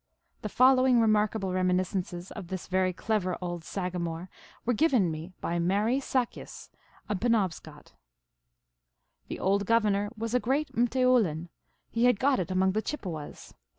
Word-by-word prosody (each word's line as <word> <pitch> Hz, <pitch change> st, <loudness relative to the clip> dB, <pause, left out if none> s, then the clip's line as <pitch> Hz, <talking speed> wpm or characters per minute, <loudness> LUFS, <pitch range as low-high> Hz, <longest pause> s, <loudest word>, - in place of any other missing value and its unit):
The 215 Hz, -, -4 dB
following 255 Hz, +1 st, +5 dB
remarkable 215 Hz, -3 st, +1 dB
reminiscences 185 Hz, -1 st, -1 dB
of 200 Hz, -5 st, -8 dB
this 185 Hz, 0 st, -5 dB
very 185 Hz, 0 st, +1 dB
clever 185 Hz, -1 st, -1 dB
old 175 Hz, -2 st, -5 dB
saga 180 Hz, 0 st, -4 dB
more 170 Hz, +1 st, -5 dB, 0.3 s
were 245 Hz, -, +2 dB
given 265 Hz, -4 st, +3 dB
to 175 Hz, -, 0 dB
me 160 Hz, +3 st, -6 dB
by 170 Hz, 0 st, -1 dB
Marie 205 Hz, +9 st, +1 dB
Sakis, 255 Hz, -3 st, -3 dB, 0.4 s
a 210 Hz, -, -1 dB
Penobscot: 185 Hz, -8 st, -2 dB, 0.7 s
" -, -, -51 dB
The -, -, -6 dB
old 200 Hz, +1 st, +1 dB
governor 210 Hz, -3 st, +2 dB
was 230 Hz, +1 st, -4 dB
a 250 Hz, -, +4 dB
great 275 Hz, +5 st, -1 dB
rrCteoulin. 235 Hz, -9 st, +2 dB, 0.4 s
He 230 Hz, +1 st, +2 dB
had 245 Hz, -5 st, +4 dB
got 270 Hz, 0 st, +2 dB
it 180 Hz, -, -3 dB
among 190 Hz, 0 st, +2 dB
the 215 Hz, +3 st, -1 dB
Chippewas. 180 Hz, -, -6 dB
195 Hz, 150 wpm, -28 LUFS, 180-230 Hz, 0.7 s, following